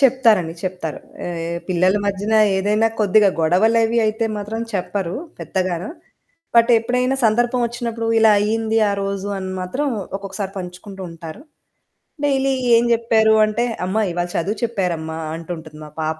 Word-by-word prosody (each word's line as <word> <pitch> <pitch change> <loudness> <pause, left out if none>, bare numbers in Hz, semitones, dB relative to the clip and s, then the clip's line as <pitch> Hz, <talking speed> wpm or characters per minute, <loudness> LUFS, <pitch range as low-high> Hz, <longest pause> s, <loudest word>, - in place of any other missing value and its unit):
చెప్తారండి. 230 -11 +4
చెప్తారు. 180 -4 -4 0.3
ఆహ్, 170 0 -3
పిల్లల 185 +2 +2
మధ్యన 205 +2 -1 0.2
ఏదైనా 210 +3 +2
కొద్దిగ 210 0 +4 0.2
గొడవలవి 225 +7 +3
అయితే 220 +1 0
మాత్రం 210 +2 -4
చెప్పరూ 190 -2 -2 0.2
పెద్దగాన, 185 -3 -2 0.7
బట్ 235 +1 +6
ఎప్పుడైనా 250 +3 0
సందర్భవొచ్చినప్పుడూ, 235 0 0
"ఇలా 220 -1 +6
అయ్యింది 225 +1 0
ఆ - - 0
రోజు" 195 0 -3
అని 190 0 -5
మాత్రం 220 +12 -2 0.3
ఒక్కొక్కసారి 195 0 -5
పంచుకుంటూ 185 +2 -8
ఉంటారు. 165 - -9 0.8
డైలీ 270 -1 +2 0.2
ఏం 230 +1 +5
జెప్పారు 225 -1 +3
అంటే, 215 +3 -1 0.2
"అమ్మా, 215 +4 0
ఇవాళ 175 +1 -2
చదువు 200 +6 -1
చెప్పారమ్మా" 175 -8 -2 0.2
అంటుంటది 160 -2 -8
మా 150 - -11
పాప. 155 0 -2
205 Hz, 130 wpm, -20 LUFS, 180-225 Hz, 0.8 s, బట్